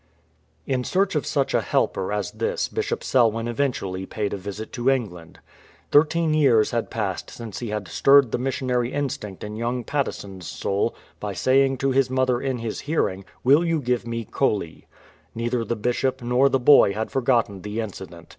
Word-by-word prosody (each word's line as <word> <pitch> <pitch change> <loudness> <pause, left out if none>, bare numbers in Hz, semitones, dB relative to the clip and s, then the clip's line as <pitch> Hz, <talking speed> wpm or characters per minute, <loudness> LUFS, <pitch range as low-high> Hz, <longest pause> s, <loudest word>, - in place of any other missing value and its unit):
In 130 -2 -1
search 195 +7 +1
of - - -1
such - - 0
a - - +3
helper - - 0
as - - -2
this 475 +2 -1
Bishop 440 +1 -3
Selwyn 115 -2 +2
event 125 +2 0
ually 95 0 -5
paid 105 -2 -2
a - - 0
visit 100 +3 -7
to 120 +2 +1
England. 100 -11 -2 0.5
Thirteen 160 +2 +3
years 130 -8 +4
had 120 -1 -1
passed 100 -5 -3
since 115 -4 -8
he 120 - -5
had 105 -2 -3
stirred 135 +6 +5
the - - -1
missionary 125 -1 -1
instinct 120 -9 -4
in 105 0 -6
young 120 +2 -2
Patteson's 100 - -4
soul 100 +4 -1 0.2
by 105 -1 -4
saying 135 +5 +2
to 135 +1 0
his 130 -1 +2
mother 130 -1 +1
in 135 -2 -1
his 115 -2 -4
hearing, 100 -11 -1
" - - -34
Will 140 +6 +5
you 165 -2 +1
give 125 -3 -1
me 115 -1 -3
Coley? 100 - -2 0.2
" 80 +1 -32
Neither 120 +1 -1
the 120 +2 -2
Bishop 125 +3 -1
nor 125 +3 +3
the 135 - +2
boy 125 -6 +6
had 110 +2 -3
forgotten 120 -7 +1
the 105 +3 -4
incident. 95 -6 -7
120 Hz, 185 wpm, -24 LUFS, 105-135 Hz, 0.5 s, boy